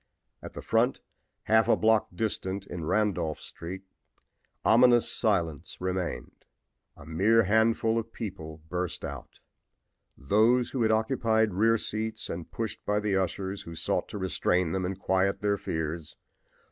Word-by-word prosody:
At -, -, -9 dB
the -, -, -8 dB
front, 120 Hz, +4 st, +2 dB, 0.4 s
half 110 Hz, +1 st, +3 dB
a -, -, +5 dB
block 110 Hz, 0 st, +3 dB
distant, 100 Hz, -2 st, -2 dB
in 90 Hz, -4 st, -6 dB
Randolph 95 Hz, -6 st, 0 dB
street, 95 Hz, +3 st, -8 dB, 0.8 s
ominous 120 Hz, +1 st, +5 dB
silence 85 Hz, -, -1 dB
maintained. 90 Hz, -1 st, -4 dB, 0.5 s
A -, -, -13 dB
mere 100 Hz, +8 st, +3 dB
handful 110 Hz, +2 st, +2 dB
of 115 Hz, 0 st, -7 dB
people 80 Hz, -9 st, -7 dB
burst 90 Hz, +1 st, -3 dB
out, -, -, -8 dB, 0.8 s
those 110 Hz, -, +3 dB
who 130 Hz, -, -2 dB
had 110 Hz, -, +3 dB
occupied 110 Hz, -2 st, +2 dB
rear 115 Hz, +4 st, +3 dB
seats 110 Hz, +1 st, -3 dB
and 85 Hz, 0 st, -6 dB
pushed 115 Hz, -2 st, -5 dB
by 105 Hz, 0 st, +1 dB
the 105 Hz, -2 st, 0 dB
ushers 95 Hz, +1 st, -2 dB
who 85 Hz, -, -9 dB
sought -, -, -1 dB
to -, -, -6 dB
restrain 90 Hz, -2 st, 0 dB
them 95 Hz, 0 st, -1 dB
and 95 Hz, +1 st, -3 dB
quiet 95 Hz, 0 st, +1 dB
their 100 Hz, -1 st, +1 dB
fears. 80 Hz, 0 st, -4 dB
100 Hz, 145 wpm, -28 LUFS, 90-110 Hz, 0.8 s, a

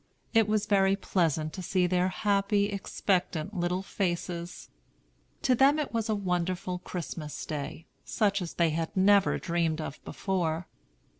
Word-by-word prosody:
It 225 Hz, -2 st, +5 dB
was 215 Hz, -1 st, +1 dB
very 195 Hz, -1 st, +3 dB
pleasant 160 Hz, -6 st, 0 dB
to 190 Hz, -, -5 dB
see 185 Hz, 0 st, +1 dB
their 180 Hz, 0 st, +2 dB
happy, 200 Hz, +1 st, +1 dB
expectant 190 Hz, -3 st, -1 dB
little 180 Hz, +1 st, -1 dB
faces. 175 Hz, -2 st, -3 dB, 0.7 s
To 255 Hz, -, +4 dB
them 270 Hz, +4 st, +5 dB
it 300 Hz, -4 st, -2 dB
was 225 Hz, -1 st, -1 dB
a 215 Hz, -, +2 dB
wonderful 180 Hz, -1 st, -1 dB
Christmas 165 Hz, -4 st, -6 dB
day, 150 Hz, +1 st, -5 dB, 0.2 s
such 200 Hz, -2 st, +1 dB
as 170 Hz, -, -5 dB
they 170 Hz, -2 st, +3 dB
had 165 Hz, +3 st, -3 dB
never 195 Hz, +1 st, +5 dB
dreamed 170 Hz, -2 st, 0 dB
of 155 Hz, -2 st, -6 dB
before. 175 Hz, -3 st, -2 dB
185 Hz, 145 wpm, -29 LUFS, 170-200 Hz, 0.7 s, It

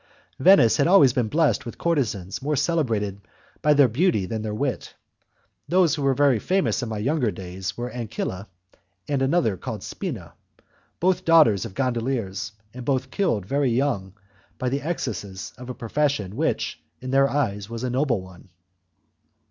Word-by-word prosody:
Venice 130 Hz, -, +6 dB
has 140 Hz, -, +3 dB
always 150 Hz, -9 st, +6 dB
been 120 Hz, -3 st, 0 dB
blessed 155 Hz, +5 st, +2 dB
with 115 Hz, -, -8 dB
courtezans 110 Hz, -, -1 dB
more 150 Hz, +3 st, 0 dB
celebrated 115 Hz, -, 0 dB, 0.4 s
by 150 Hz, 0 st, +4 dB
their 140 Hz, -2 st, +6 dB
beauty 130 Hz, -, +1 dB
than 110 Hz, +4 st, -4 dB
their 110 Hz, -1 st, -3 dB
wit. 130 Hz, +1 st, -3 dB, 0.7 s
Those 175 Hz, -1 st, +3 dB
who 155 Hz, -, -2 dB
were 135 Hz, -1 st, +2 dB
most 140 Hz, -6 st, +3 dB
famous 190 Hz, -4 st, +1 dB
in 120 Hz, -, -4 dB
my 110 Hz, -, -3 dB
younger 130 Hz, +2 st, +1 dB
days 95 Hz, 0 st, -6 dB
were 120 Hz, +1 st, -4 dB
Ancilla 110 Hz, -4 st, -4 dB, 0.6 s
and 140 Hz, -2 st, 0 dB
another 135 Hz, -, +2 dB
called -, -, -6 dB
Spina, -, -, -6 dB, 0.7 s
both 185 Hz, +1 st, +3 dB
the -, -, -20 dB
daughters 150 Hz, -, +5 dB
of 100 Hz, -4 st, -9 dB
gondoliers, 115 Hz, -5 st, -2 dB, 0.2 s
and 125 Hz, 0 st, -8 dB
both 130 Hz, 0 st, -1 dB
killed 115 Hz, -, 0 dB
very 140 Hz, +5 st, +1 dB
young 115 Hz, -7 st, -1 dB, 0.4 s
by 130 Hz, -, -1 dB
the 140 Hz, +2 st, -2 dB
excesses 105 Hz, -, -4 dB
of 125 Hz, +1 st, -10 dB
a 125 Hz, -, -5 dB
profession 125 Hz, -5 st, -1 dB
which, 160 Hz, +5 st, -1 dB, 0.2 s
in 130 Hz, 0 st, -6 dB
their 135 Hz, 0 st, +4 dB
eyes, 105 Hz, -8 st, -1 dB
was 115 Hz, +1 st, -6 dB
a 130 Hz, -, -1 dB
noble 125 Hz, -6 st, 0 dB
one. 95 Hz, 0 st, -15 dB
125 Hz, 165 wpm, -24 LUFS, 105-145 Hz, 0.7 s, Venice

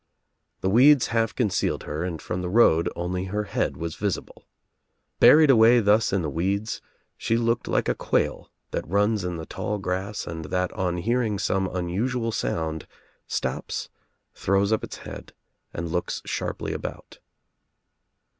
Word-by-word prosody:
The 95 Hz, -, +1 dB
weeds 130 Hz, +4 st, +6 dB
half 115 Hz, -1 st, +1 dB
concealed 105 Hz, -7 st, 0 dB
her 75 Hz, +3 st, -4 dB
and 85 Hz, -3 st, -3 dB
from 90 Hz, +4 st, -4 dB
the 90 Hz, -, -3 dB
road 90 Hz, -6 st, +4 dB
only 90 Hz, +2 st, -2 dB
her 105 Hz, +3 st, -2 dB
head 105 Hz, -, -2 dB
was 85 Hz, -1 st, -4 dB
visible. 100 Hz, -3 st, -4 dB, 0.7 s
Buried 155 Hz, -2 st, +8 dB
away 115 Hz, 0 st, +6 dB
thus 105 Hz, 0 st, +3 dB
in 95 Hz, -3 st, 0 dB
the -, -, -1 dB
weeds 100 Hz, +7 st, -1 dB, 0.4 s
she 115 Hz, -, 0 dB
looked 115 Hz, 0 st, 0 dB
like -, -, +1 dB
a -, -, +2 dB
quail -, -, -1 dB, 0.2 s
that -, -, -3 dB
runs 100 Hz, +3 st, +1 dB
in 90 Hz, -1 st, -3 dB
the 80 Hz, -1 st, -6 dB
tall 105 Hz, +5 st, -3 dB
grass 95 Hz, +2 st, -3 dB
and 80 Hz, -1 st, -6 dB
that 90 Hz, +2 st, -1 dB
on 90 Hz, -4 st, -1 dB
hearing 115 Hz, +2 st, 0 dB
some 95 Hz, 0 st, 0 dB
un 90 Hz, -1 st, -3 dB
usual 115 Hz, +5 st, -1 dB
sound, 80 Hz, -7 st, -2 dB, 0.4 s
stops, -, -, -3 dB, 0.4 s
throws 100 Hz, +2 st, +1 dB
up 110 Hz, -, 0 dB
its -, -, -6 dB
head -, -, -10 dB, 0.4 s
and 85 Hz, 0 st, -5 dB
looks 90 Hz, 0 st, -2 dB
sharply -, -, -3 dB
about. -, -, -7 dB
100 Hz, 155 wpm, -25 LUFS, 90-115 Hz, 0.7 s, Buried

